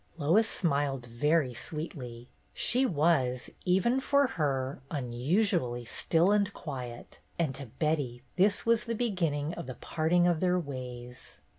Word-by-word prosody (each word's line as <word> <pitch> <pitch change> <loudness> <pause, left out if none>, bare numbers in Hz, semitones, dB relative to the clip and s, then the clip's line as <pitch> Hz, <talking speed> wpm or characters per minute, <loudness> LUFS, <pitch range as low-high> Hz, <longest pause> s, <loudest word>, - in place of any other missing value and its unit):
Lois 170 +9 +3
smiled 140 -6 0
very 130 +3 +1
sweetly. 125 -4 -6 0.3
She 255 +2 +3
was, 145 - +1
even 190 +8 +3
for 280 +1 +3
her, 140 - -1
unusually 130 - 0
still 165 - +2
and 205 -1 +2
quiet, 125 -6 -7 0.2
and 160 -5 0
to 135 0 -7
Betty 135 -2 -2
this 200 +2 +2
was 230 0 +3
the 230 -1 -2
beginning 170 -10 -1
of - - -7
the 130 - -6
parting 170 +2 +1
of 175 -2 +2
their 180 0 +2
ways. 125 -5 -7
155 Hz, 135 wpm, -30 LUFS, 130-180 Hz, 0.3 s, Lois